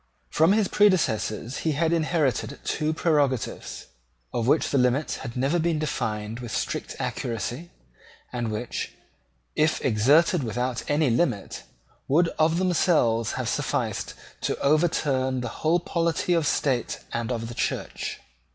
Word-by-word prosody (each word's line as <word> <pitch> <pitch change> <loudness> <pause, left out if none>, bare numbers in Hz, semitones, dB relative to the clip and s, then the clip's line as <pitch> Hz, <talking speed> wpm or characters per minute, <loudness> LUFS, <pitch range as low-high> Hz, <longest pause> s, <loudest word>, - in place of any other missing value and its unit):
From 160 +5 +4
his 210 -2 +2
predecessors 140 - +2
he 160 - 0
had 165 +3 +1
inherited 150 -6 0
two 155 0 0
prerogatives, 145 -7 0 0.5
of 120 -1 -1
which 150 +4 +3
the 140 - +3
limits 125 +4 +1
had 120 -1 -7
never 140 +7 +1
been 165 -1 +1
defined 110 -7 -3
with 120 -3 -7
strict - - -3
accuracy, 120 - -3 0.6
and 120 -2 -2
which, 110 +3 -4 0.6
if 155 +1 +2
exerted 145 - +4
without 125 +2 -2
any 145 -3 +2
limit, 115 - 0 0.5
would 165 +5 +3
of 160 +1 +3
themselves 155 - +2
have - - -3
sufficed - - -2 0.3
to - - -1
overturn 140 -4 +1
the 120 -2 -6
whole 165 +3 +3
polity 170 0 0
of 165 -3 +2
the - - +3
State 130 -5 0
and 115 +1 -2
of 115 -2 -2
the 120 - -7
Church. - - -3
140 Hz, 140 wpm, -26 LUFS, 120-165 Hz, 0.6 s, From